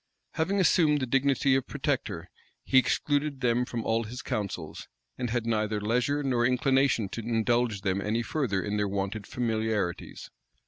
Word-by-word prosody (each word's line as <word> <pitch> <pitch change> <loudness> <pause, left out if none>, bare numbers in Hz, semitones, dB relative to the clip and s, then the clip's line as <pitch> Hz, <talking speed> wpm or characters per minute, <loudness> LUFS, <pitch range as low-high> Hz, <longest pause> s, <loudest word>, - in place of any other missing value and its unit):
Having 190 +5 0
assumed 150 -3 +4
the 130 - -1
dignity 135 +1 +2
of 135 - -1
protector, - - -2 0.4
he 130 - +5
excluded 145 +1 0
them 125 0 +2
from 120 -2 -4
all 115 +1 +1
his 120 +3 -7
councils, 105 -6 -4 0.3
and 125 - -3
had 120 0 -1
neither 110 -2 0
leisure 125 +7 0
nor 125 -3 +1
inclination 130 -3 +2
to 115 - -5
indulge 115 -1 0
them 95 0 0
any 110 +3 -1
further 115 - -1
in 105 0 -2
their 105 0 +1
wonted 100 +1 -3
familiarities. 110 -6 -2
120 Hz, 155 wpm, -28 LUFS, 105-135 Hz, 0.4 s, he